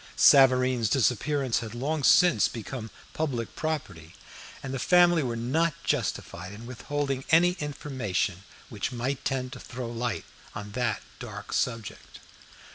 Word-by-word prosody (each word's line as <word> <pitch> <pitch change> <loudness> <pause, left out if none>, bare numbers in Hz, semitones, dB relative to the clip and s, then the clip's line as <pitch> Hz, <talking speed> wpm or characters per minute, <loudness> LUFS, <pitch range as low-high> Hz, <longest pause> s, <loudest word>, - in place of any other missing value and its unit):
Savareen's 130 -4 +5
disappearance 135 0 +1
had 115 -1 -7
long 145 +5 -1
since 175 - +5
become 115 0 -6 0.2
public 130 -7 -3
property, 130 - -4 0.5
and 135 -1 -5
the 135 - -2
family 175 +2 +5
were 120 -4 -2
not 150 +8 0
justified 100 - -2
in 110 +3 -10
withholding 135 +2 -3
any 170 +2 +5
information 130 -11 -2 0.3
which 105 +2 -3
might 130 +2 -3
tend 130 -1 -2
to 125 - -8
throw 125 -2 -6
light 120 -1 -3 0.3
on 105 0 -6
that 115 -2 -1 0.2
dark - - -8
subject. 115 -4 -3
125 Hz, 130 wpm, -27 LUFS, 115-145 Hz, 0.5 s, Savareen's